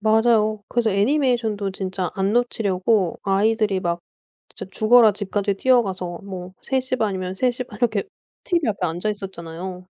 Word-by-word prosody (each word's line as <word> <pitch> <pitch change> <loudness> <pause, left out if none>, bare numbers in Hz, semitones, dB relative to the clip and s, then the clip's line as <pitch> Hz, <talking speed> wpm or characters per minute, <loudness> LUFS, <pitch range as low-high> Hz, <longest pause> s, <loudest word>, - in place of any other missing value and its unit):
맞아요. 215 -1 +3
그래서 235 -2 +1
애니메이션도 220 -2 +1
진짜 185 -2 -3
안 195 +1 0
놓치려고 205 -5 +1
아이들이 205 0 +1
막 170 -1 -2 0.5
진짜 - - -8
죽어라 220 +1 +5
집까지 200 0 -2
뛰어가서 190 -7 +1
뭐 185 -2 -7
3:30 255 -6 -1
이면 185 0 -4
3:30 250 +3 -2
이렇게 220 -5 +1 0.4
TV 340 - +1
앞에 200 -3 -1
앉아 175 +6 -2
있었잖아요. 180 -2 -7
205 Hz, 320 characters per minute, -22 LUFS, 190-230 Hz, 0.5 s, 죽어라